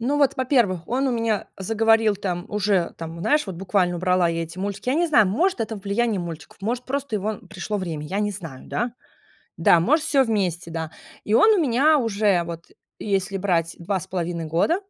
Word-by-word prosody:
Ну, 270 Hz, +5 st, 0 dB
вот, 280 Hz, -3 st, +3 dB
во-первых, 235 Hz, -, +1 dB
он 265 Hz, +2 st, +1 dB
у -, -, 0 dB
меня 230 Hz, -3 st, -1 dB
заговорил, 225 Hz, +1 st, +3 dB
там, 180 Hz, -2 st, -3 dB
уже, 200 Hz, -4 st, 0 dB
там, 165 Hz, 0 st, -7 dB
знаешь, 300 Hz, -, +2 dB
вот 185 Hz, -3 st, -6 dB
буквально 180 Hz, -1 st, 0 dB
убрала 180 Hz, -1 st, +2 dB
я 165 Hz, 0 st, -1 dB
эти 165 Hz, +3 st, -12 dB
мультики. 200 Hz, +5 st, -4 dB
Я -, -, +2 dB
не 340 Hz, +2 st, +2 dB
знаю, 220 Hz, -9 st, +5 dB
может 295 Hz, -, +1 dB
это 220 Hz, 0 st, -2 dB
влияние 205 Hz, +1 st, -1 dB
мультиков, 165 Hz, -3 st, -8 dB
может, 245 Hz, +4 st, -2 dB
просто 275 Hz, -4 st, -2 dB
его 210 Hz, +1 st, -3 dB
пришло 210 Hz, +1 st, -3 dB
время, 160 Hz, -5 st, -4 dB
я 195 Hz, +5 st, -2 dB
не 205 Hz, 0 st, 0 dB
знаю, 165 Hz, -10 st, -9 dB
да. 240 Hz, 0 st, -2 dB, 0.6 s
Да, 165 Hz, 0 st, +5 dB
может, 305 Hz, -, +2 dB
всё 280 Hz, -4 st, +3 dB
вместе, 185 Hz, -6 st, -1 dB
да. 160 Hz, -1 st, -4 dB, 0.3 s
И 210 Hz, -, 0 dB
он 430 Hz, -, +6 dB
у -, -, +2 dB
меня 290 Hz, +3 st, +4 dB
уже, 205 Hz, -6 st, +1 dB
вот 170 Hz, 0 st, -7 dB, 0.3 s
если 195 Hz, -1 st, -1 dB
брать 170 Hz, -4 st, 0 dB
2,5 175 Hz, -2 st, -3 dB
года, 170 Hz, -, +2 dB
200 Hz, 195 wpm, -23 LUFS, 175-235 Hz, 0.6 s, он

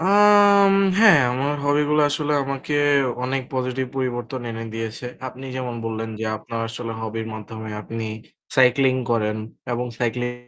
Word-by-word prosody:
আম 200 Hz, +1 st, +6 dB, 0.3 s
হ্যাঁ, 215 Hz, -9 st, +8 dB
আমার 140 Hz, +3 st, -1 dB
hobby 145 Hz, +1 st, +3 dB
গুলা 150 Hz, 0 st, +4 dB
আসলে 150 Hz, 0 st, -1 dB
আমাকে 140 Hz, +2 st, -3 dB, 0.5 s
অনেক 130 Hz, +1 st, -1 dB
positive 130 Hz, 0 st, -2 dB
পরিবর্তন 130 Hz, 0 st, -3 dB
এনে 115 Hz, 0 st, -5 dB
দিয়েছে। 115 Hz, +2 st, -5 dB, 0.2 s
আপনি 130 Hz, +1 st, -11 dB
যেমন 125 Hz, -2 st, -4 dB
বললেন, 115 Hz, 0 st, -3 dB
যে -, -, -2 dB
আপনার 115 Hz, +1 st, -6 dB
আসলে 115 Hz, 0 st, -5 dB
hobby 110 Hz, 0 st, -4 dB
র -, -, -9 dB
মাধ্যমে 110 Hz, 0 st, -8 dB
আপনি 115 Hz, +1 st, -5 dB, 0.5 s
cycling 130 Hz, 0 st, +4 dB
করেন 105 Hz, -2 st, +1 dB, 0.4 s
এবং 120 Hz, +1 st, -2 dB
cycling 120 Hz, 0 st, -1 dB
125 Hz, 150 wpm, -22 LUFS, 115-145 Hz, 0.5 s, হ্যাঁ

